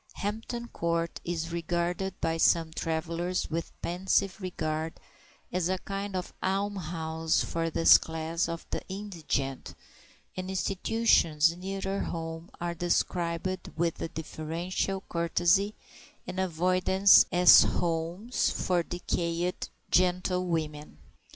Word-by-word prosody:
Hampton 225 +4 -4
Court 170 -4 -2
is 165 -1 -3
regarded 175 +2 -2
by 165 0 0
some 165 -1 +3
travellers 165 +2 -2
with 165 +1 -4
pensive 190 +2 0
regard 160 -3 -3 0.5
as 180 -1 0
a 190 - +1
kind 195 +1 -5
of 180 -1 -4
almshouse 170 -5 -1
for 165 0 -2
this 165 +1 +7
class 160 +1 -2
of 165 0 -5
the - - -2
indigent, 165 -9 -3 0.6
and 185 0 -5
institutions 185 -5 +2
nearer 195 +2 -3
home 165 0 -5
are 175 0 -2
described 175 +1 -1
with 165 0 0
a - - -1
deferential 170 +4 -3
courtesy 175 +4 +2 0.5
and 185 - -5
avoidance 185 +2 +5
as 180 -1 +8
homes 175 +7 0
for 180 -2 0
decayed 175 0 -2 0.2
gentlewomen. 180 - 0
175 Hz, 105 wpm, -29 LUFS, 165-185 Hz, 0.6 s, as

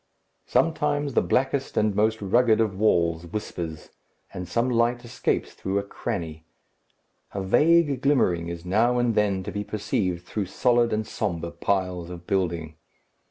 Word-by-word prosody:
Sometimes 145 -3 +1
the - - +4
blackest 135 +1 0
and 105 -1 +2
most 110 +1 +1
rugged 115 +3 +3
of 110 -4 +1
walls 85 -5 +1
whispers, 85 -5 -6 0.4
and 90 0 -5
some 115 +7 0
light 120 0 +1
escapes 120 +1 -2
through 95 +1 -3
a 100 - 0
cranny. 80 -5 -5 0.9
A 100 - -2
vague 145 - +3
glimmering 95 -12 +2
is 85 0 -6
now 115 +7 +2
and 120 -1 +2
then 100 -3 +1
to 105 - -5
be 105 0 -3
perceived 95 -4 -2
through 105 -3 -3
solid 120 +4 +2
and 110 0 -1
sombre 85 -7 -3
piles 90 -3 -1
of 85 -1 -9
building. 85 -5 -1
105 Hz, 150 wpm, -25 LUFS, 90-120 Hz, 0.9 s, the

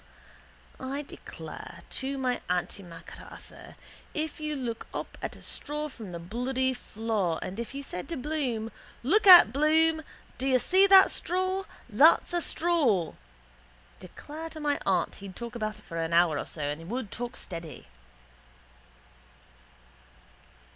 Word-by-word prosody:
I 275 +3 -4
declare - - -10
to 275 +1 -3
my 255 -2 -1
antimacassar 175 -1 -6 0.4
if 310 0 -3
you 305 0 -2
took 230 -1 -4
up - - -5
a - - -5
straw 300 +1 -3
from 225 -7 -9
the 170 - -5
bloody 250 +9 -1
floor 215 -8 -2
and 195 +4 -6
if 235 +3 -5
you 280 - -4
said 180 -4 -6
to 335 - -3
Bloom: 255 -6 -2 0.3
Look 405 - +3
at, 350 - +11
Bloom. 315 +2 +3 0.4
Do 265 - 0
you 260 -1 +5
see 375 +9 +4
that 385 -1 +8
straw? 370 +2 -1 0.2
That's - - +5
a 345 - +2
straw. 285 - +2 0.9
Declare 315 +2 -8
to 320 - -9
my 290 -1 0
aunt 190 -2 +2
he'd 195 -2 -9
talk 235 -1 -6
about 215 -2 -3
it 210 - -18
for 165 - -7
an 165 0 -1
hour 170 -3 +4
so 145 -2 -3
he 165 - -12
would 230 +10 -3
and 215 -6 -7
talk 245 +1 -5
steady. 165 - -8
255 Hz, 140 wpm, -28 LUFS, 195-305 Hz, 0.9 s, at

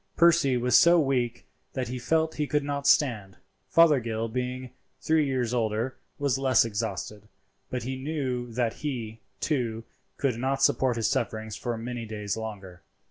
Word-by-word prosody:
Percy 170 -6 +5
was 125 0 +2
so 170 0 +7
weak 130 -5 0 0.3
that 130 -3 -3
he 125 0 -4
felt 160 +5 +1
he 150 -1 -2
could 150 0 +1
not 140 0 -2
stand. 110 -12 +2 0.3
Fothergill, 120 -9 +3
being 125 +1 -4 0.3
three 155 -2 +2
years 125 -3 -1
older, 115 +2 -1 0.2
was 140 -2 0
less 130 -3 +4
exhausted; 105 -1 -4 0.4
but 125 -2 -3
he 130 +2 -4
knew 130 -5 -2
that 115 -1 0
he, 115 -7 -5 0.2
too, 115 -4 -1 0.3
could 125 -5 0
not 135 +2 0
support 130 -3 +3
his 115 -1 0
sufferings 110 -1 -2
for 120 -2 -3
many 120 0 -5
days 105 -2 -3
longer. 100 -5 -7
125 Hz, 155 wpm, -27 LUFS, 115-140 Hz, 0.4 s, so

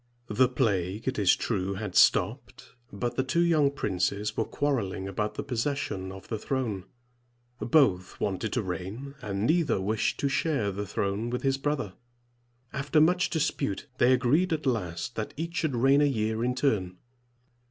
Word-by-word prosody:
The 125 +4 +3
plague, 105 -5 -1
it 130 -3 0
is 95 -3 +5
true, 100 -3 -2
had 105 -2 -5
stopped; - - +2 0.2
but 120 +5 -3
the 130 - +2
two 170 +7 +2
young 155 -4 +4
princes 105 -4 -1
were - - 0
quarreling 110 -10 -1
about 105 +2 -2
the 140 - -3
possession 125 -7 -2
of 95 0 -11
the 110 - -3
throne. 110 -7 -2 0.7
Both 115 - +2
wanted 100 +2 -2
to 120 - 0
reign, 95 +9 -5
and 100 0 -2
neither 160 - +2
wished 105 +3 0
to 140 - +2
share 135 -6 0
the 100 +1 -4
throne 100 +5 -1
with 125 +1 -3
his 135 0 +1
brother. 135 -9 -2 0.8
After 140 +3 +1
much 180 +4 +4
dispute, 145 - -1
they 120 - +5
agreed 135 +9 +3
at 155 -2 -1
last 100 -6 -2
that 110 - -4
each 170 +2 -4
should 155 -6 0
reign 135 +4 +4
a - - +5
year 110 -4 0
in 125 +1 0
turn. 100 -10 0
120 Hz, 165 wpm, -28 LUFS, 100-140 Hz, 0.8 s, is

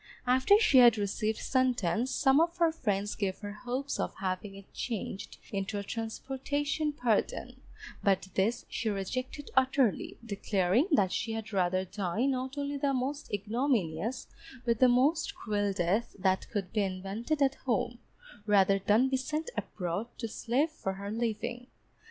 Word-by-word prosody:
After 260 +11 +5
she 285 - +6
had 240 -3 +8
received 215 +2 -1
sentence, 250 -3 +1
some 270 +3 +4
of 340 +1 0
her 335 -2 +4
friends 205 -9 -1
gave 190 -2 -2
her 205 -1 -5
hopes 250 +6 -4
of - - -2
having 190 +1 -3
it 195 0 -14
changed 215 -4 -4
into 200 +1 -2
a 200 - -3
transportation 275 +7 -2
pardon, 245 -7 -1 0.4
but 195 -1 +2
this 215 +6 0
she 225 - -2
rejected 255 +8 -4
utterly, 260 -3 +2
declaring 200 - +1
that 195 -8 +4
she 225 - -2
had 220 -2 -5
rather 185 0 +1
die 200 +4 -1
not 260 0 -1
only 285 0 -2
the 275 -1 +1
most 275 +4 -3
ignominious, 215 - -1 0.4
but 230 -2 +1
the 255 - +6
most 310 +10 +2
cruel 205 - -1
death 190 +5 0
that 190 -1 +1
could 195 -4 -3
be 215 - +2
invented 195 +9 -2
at 275 -1 +3
home, 235 0 0 0.5
rather 195 -1 +4
than 210 +6 +3
be 265 0 +1
sent 305 - -3
abroad 180 +3 -3
to 230 - -3
slave 250 +8 0
for 195 -11 -4
her 200 +1 -6
living. 235 +2 -3
230 Hz, 155 wpm, -30 LUFS, 200-265 Hz, 0.5 s, had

